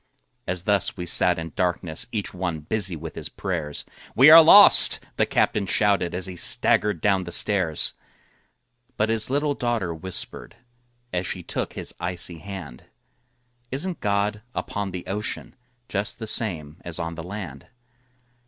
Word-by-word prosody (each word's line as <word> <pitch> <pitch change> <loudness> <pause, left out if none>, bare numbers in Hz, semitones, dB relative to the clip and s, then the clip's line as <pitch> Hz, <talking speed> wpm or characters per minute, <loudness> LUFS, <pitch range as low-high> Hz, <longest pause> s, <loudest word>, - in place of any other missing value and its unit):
As 90 -1 -2
thus 100 0 0
we 90 - -5
sat 90 +1 +2
in 80 -2 -7
darkness 90 +2 -2
Each 105 -4 -4
one 90 -4 -4
busy 95 +2 -1
with 80 0 -8
his - - -7
prayers, 80 -6 -4 0.3
"We 140 +4 +7
are 165 +1 +11
lost!" 200 +6 +9 0.2
the - - 0
captain 100 -2 0
shouted, 100 -4 0
As 90 - -4
he 95 -1 -8
staggered 100 +1 +3
down 95 -2 +1
the 85 - -8
stairs. 90 -3 +2 1.0
But 105 +1 0
his 115 0 0
little 145 +2 0
daughter 115 -10 -2
whispered, 90 +5 -5 0.6
As 90 0 -2
she - - -5
took - - -4
his - - -6
icy 85 -1 -3
hand, 90 -9 -10 0.8
"Isn't 165 +8 -4
God 105 +1 -1
upon 100 -1 -4
the 90 -1 -7
ocean, 105 +2 -5 0.3
Just 100 +1 -4
the 115 - -7
same 85 -9 -3
as 85 -1 -5
on 85 -1 -4
the 85 - -8
land?" 90 -6 -9
95 Hz, 155 wpm, -23 LUFS, 85-105 Hz, 1.0 s, are